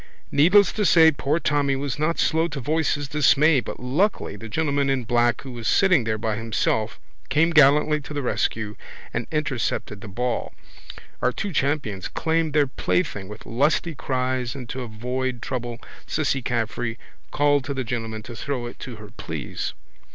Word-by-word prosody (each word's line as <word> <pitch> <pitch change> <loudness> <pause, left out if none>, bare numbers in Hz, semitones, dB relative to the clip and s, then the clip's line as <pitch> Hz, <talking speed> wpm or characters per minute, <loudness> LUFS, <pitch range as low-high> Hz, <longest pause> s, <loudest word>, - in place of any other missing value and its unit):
Needless 180 +7 +5
to 215 - 0
say 160 -4 +7
poor 145 +1 0
Tommy 145 -4 +1
was 140 0 -3
not 160 +2 +1
slow 160 +1 +2
to 150 -4 -5
voice 155 +3 +1
his 145 -1 -4
dismay 150 0 +4
but - - -6
luckily 140 - 0
the 110 +2 -9
gentleman 140 +1 0
in 135 -2 +1
black 120 0 +2
who 135 - -8
was 120 -2 -5
sitting 180 - +4
there 110 -1 0
by 110 -1 -2
himself 110 0 -1 0.3
came 165 +3 +3
gallantly 150 0 +5
to 145 - -11
the 145 - -2
rescue 110 -3 -1 0.4
and 120 - -2
intercepted 135 -9 -2
the - - -8
ball. 120 +4 -2 0.7
Our 125 - +2
two 200 +7 -4
champions 140 - -1
claimed 160 -1 0
their 150 -1 +4
plaything 130 - -1
with 105 +2 -10
lusty 150 +7 +1
cries 130 -2 -2
and 130 -3 -7
to 130 - -4
avoid 125 +2 -3
trouble 120 -1 -4 0.3
Cissy 140 -3 0
Caffrey 120 -1 -2 0.3
called 145 -1 +2
to 140 - -3
the 130 - -1
gentleman 115 -3 -4
to 120 - -9
throw 130 -1 -3
it 120 - -8
to 125 - -7
her 105 -1 -12
please. - - -5
135 Hz, 175 wpm, -24 LUFS, 120-150 Hz, 0.7 s, say